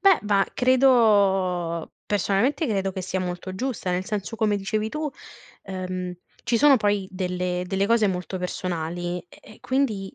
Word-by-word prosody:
Beh, 390 -4 +6
ba 200 -2 +3
credo 200 -10 +3
personalmente 210 - +1
credo 195 -4 -1
che 190 - -4
sia 185 +1 -2
molto 180 +1 -4
giusta. 240 -4 -3
Nel 180 +1 -1
senso, 210 +3 -4
come 210 -2 +2
dicevi 215 +2 -1
tu, 305 +5 -3 0.5
ehm, 185 -1 -4 0.3
ci 235 - +2
sono 290 -2 +7
poi 205 -3 0
delle 180 -1 -2
delle 195 +2 0
cose 230 -2 +4
molto 180 0 -3
personali 175 -1 -3
e - - -17 0.2
e - - -22
quindi, 225 -8 -1
195 Hz, 155 wpm, -24 LUFS, 180-220 Hz, 0.5 s, sono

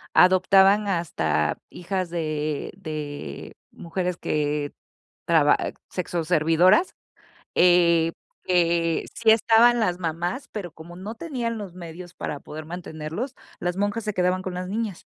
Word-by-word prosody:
adoptaban 190 +3 +5
hasta 80 - 0
hijas 185 0 -3
de 155 -3 -2
de 150 - -6 0.2
mujeres 180 +1 -3
que 150 -2 -1 0.6
traba 160 -4 +5 0.3
sexo 175 -2 -3
servidoras. 170 - +4 0.6
Eh, 170 -2 +4 0.4
que 170 -2 +2
sí 225 -1 +3
estaban 230 +2 +5
las 180 -6 +1
mamás, 175 - -3
pero 195 -5 -5
como 165 +3 -12
no 200 +5 -7
tenían 240 -6 -3
los 200 -5 -7
medios 175 0 -9
para 150 -4 -5
poder 155 +2 -9
mantenerlos, 170 - -5 0.3
las 175 0 -2
monjas 205 +3 -1
se 210 0 -2
quedaban 185 0 +1
con 185 - -4
las 180 +1 -4
niñas. 210 -3 -3
175 Hz, 125 wpm, -24 LUFS, 160-195 Hz, 0.6 s, adoptaban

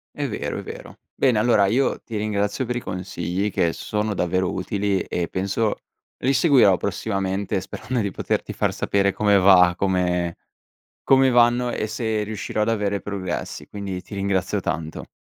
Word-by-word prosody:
È - - -2
vero, - - -4
è - - -5
vero. - - -9 0.2
Bene 125 -5 +2
allora 105 -3 +4
io 125 +7 +1
ti 115 - -7
ringrazio 105 +3 -1
per 125 0 -3
i - - -1
consigli, 90 0 -3
che 85 -3 +1
sono 105 +3 -2
davvero 95 0 0
utili 100 +1 -1
e 85 -1 -3
penso 100 +3 -1 0.5
li 130 - +3
seguirò 130 - +5
prossimamente, 95 0 -2
sperando 115 +6 -4
di 100 -2 -1
poterti - - -2
far - - 0
sapere 100 0 +1
come 105 +1 +3
va, 90 -2 +6
come 90 -2 0 0.7
come 135 -1 +5
vanno 120 0 +4
e 110 - -2
se 110 -1 -1
riuscirò 105 0 -3
ad 105 - 0
avere 100 -3 0
progressi, 95 -3 -5
quindi 100 -3 -5
ti - - -10
ringrazio 100 0 0
tanto. 80 -2 -4
100 Hz, 160 wpm, -23 LUFS, 95-110 Hz, 0.7 s, va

